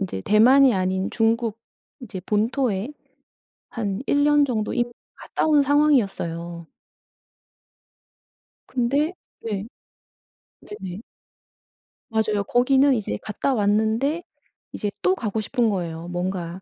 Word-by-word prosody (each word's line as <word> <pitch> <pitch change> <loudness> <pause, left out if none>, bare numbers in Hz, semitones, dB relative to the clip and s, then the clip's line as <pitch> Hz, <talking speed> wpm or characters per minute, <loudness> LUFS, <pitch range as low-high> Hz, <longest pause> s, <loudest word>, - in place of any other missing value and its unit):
인제 175 - -4
대만이 250 +4 +6
아닌 190 0 -1
중국 225 -1 0 0.4
인제 200 -7 -7
본토에 225 +2 0 0.8
한 205 -3 -3
1 285 0 +2
년 295 0 +5
정도 225 -6 -2
이미 240 0 0 0.3
갔다 - - -2
온 295 -2 +5
상황이었어요. 195 - +1 2.0
근데 280 +7 0 0.3
네. 205 -2 -3 1.0
네네. 195 - -8 1.1
맞아요. 215 -2 0
거기는 265 +3 +4
이제 200 - -2
갔다 215 +6 -2
왔는데 220 +9 +1 0.5
이제 205 - -3
또 370 - +3
가고 220 - -2
싶은 235 +1 +1
거예요. 170 -4 -4
뭔가 180 0 -4
220 Hz, 215 characters per minute, -23 LUFS, 195-265 Hz, 2.0 s, 대만이